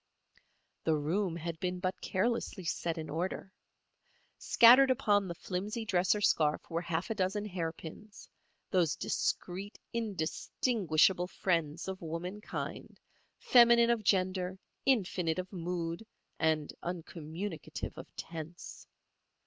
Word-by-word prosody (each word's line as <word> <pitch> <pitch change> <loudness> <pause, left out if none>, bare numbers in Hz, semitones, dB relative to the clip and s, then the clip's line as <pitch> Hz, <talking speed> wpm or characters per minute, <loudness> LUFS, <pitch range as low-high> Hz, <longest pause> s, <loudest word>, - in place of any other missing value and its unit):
The 160 - +2
room 170 +4 0
had 170 -1 -5
been 180 0 -2
but 185 +1 -2
carelessly 210 -1 -1
set 165 0 -1
in 160 -1 -4
order. 180 +5 -3 0.9
Scattered 255 +3 +7
upon 205 -6 +3
the 170 - -5
flimsy 205 +7 -4
dresser 190 0 +2
scarf 155 -7 +2
were 165 +1 0
half 170 +3 -2
a - - +2
dozen 205 +1 -1
hairpins—those 175 -1 -4
discreet, 195 +3 -2 0.2
indistinguishable 190 - +1
friends 170 -3 -1
of 190 0 -5
womankind, 175 +6 -5 0.4
feminine 235 -1 +6
of 230 -2 0
gender, 185 -1 +1 0.3
infinite 185 -9 +2
of 185 +2 -5
mood 170 0 -3 0.4
and 155 -2 +1
uncommunicative 170 +1 -5
of - - -9
tense. 165 +1 -8
180 Hz, 110 wpm, -32 LUFS, 165-205 Hz, 0.9 s, Scattered